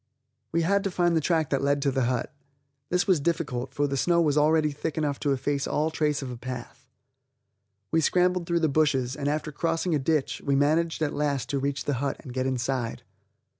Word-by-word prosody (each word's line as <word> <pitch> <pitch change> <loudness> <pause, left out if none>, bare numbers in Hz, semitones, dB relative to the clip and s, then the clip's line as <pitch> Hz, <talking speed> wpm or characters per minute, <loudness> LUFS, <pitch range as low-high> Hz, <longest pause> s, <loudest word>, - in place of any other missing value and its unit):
We 165 0 +1
had 200 +3 +2
to - - +1
find 175 -2 +1
the 160 - +2
track 160 -2 +1
that 135 - +1
led 140 +1 +2
to 140 - +2
the 130 -2 +1
hut. 125 +2 -1 0.6
This 180 0 +1
was 185 -5 +3
difficult, 140 -5 -2
for 145 - +1
the 140 -1 -1
snow 170 +5 +2
was 150 -4 +2
already 155 0 +3
thick 150 +2 -4
enough 145 -3 -1
to 145 - 0
efface 140 +1 -1
all 155 +2 0
trace 150 -3 0
of 130 - -5
a 125 - -7
path. 125 +1 -8 1.0
We 160 - +3
scrambled 180 +2 +2
through 170 -1 +1
the 160 - +3
bushes, 135 -4 +1
and 145 -1 -3
after 150 +1 -1
crossing 165 +3 -1
a 150 - +2
ditch, 150 +1 0
we 140 - +1
managed 160 +3 +2
at 150 - -1
last 145 -4 -1
to 140 - 0
reach 140 0 -2
the 145 - 0
hut 140 -1 -1
and 130 -5 -9
get 130 0 -1
inside. 130 -2 -2
145 Hz, 215 wpm, -26 LUFS, 135-160 Hz, 1.0 s, was